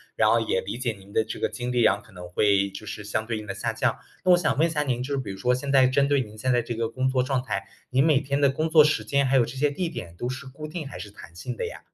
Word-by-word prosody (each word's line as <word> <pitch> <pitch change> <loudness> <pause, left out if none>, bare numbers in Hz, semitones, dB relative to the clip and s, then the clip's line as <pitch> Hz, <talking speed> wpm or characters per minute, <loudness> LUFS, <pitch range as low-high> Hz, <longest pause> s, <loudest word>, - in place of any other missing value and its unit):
然 - - +3
后 115 - +4
也 110 -4 0
理 100 +5 -5
解 125 -2 -1
您 100 -1 -14
的 110 - +3
这 - - -6
个 - - +1
精 125 0 -4
力， 125 -1 +2
然 - - +5
后 100 - -11
可 - - -19
能 90 -1 -9
会 100 +2 +2
就 100 +2 -9
是 105 0 -6
相 110 +1 -2
对 110 -1 -2
应 105 - -8
的 100 - -3
下 - - -2
降。 - - 0 0.3
那 185 - +6
我 175 - +7
想 175 - 0
问 160 +3 +4
一 - - -4
下 150 -2 0
您， 125 -3 -1
就 140 +2 -2
比 115 -7 -4
如 95 - -7
说 125 +5 +2
现 140 +2 -3
在 130 -2 +6
针 140 +2 +2
对 145 - +3
您 110 -4 -5
现 130 +4 0
在 120 -1 +3
这 115 0 -5
个 115 0 -1
工 130 +2 -1
作 130 -1 +2
状 130 0 0
态， 125 - -3 0.3
你 130 +1 +3
每 150 -2 +4
天 140 0 -1
的 140 - +5
工 155 +4 -1
作 155 -1 +8
时 150 - +1
间 140 0 +2
还 135 +1 +3
有 120 - +4
这 120 +3 -8
些 145 +2 +1
地 175 +4 -2
点 90 - -7
都 120 - -3
是 130 +2 -5
固 135 +3 -8
定 155 0 -5
还 - - -8
是 105 - -7
弹 85 -4 -13
性 100 +9 -6
的 - - -3
呀？ - - -8
125 Hz, 360 characters per minute, -25 LUFS, 110-140 Hz, 0.3 s, 作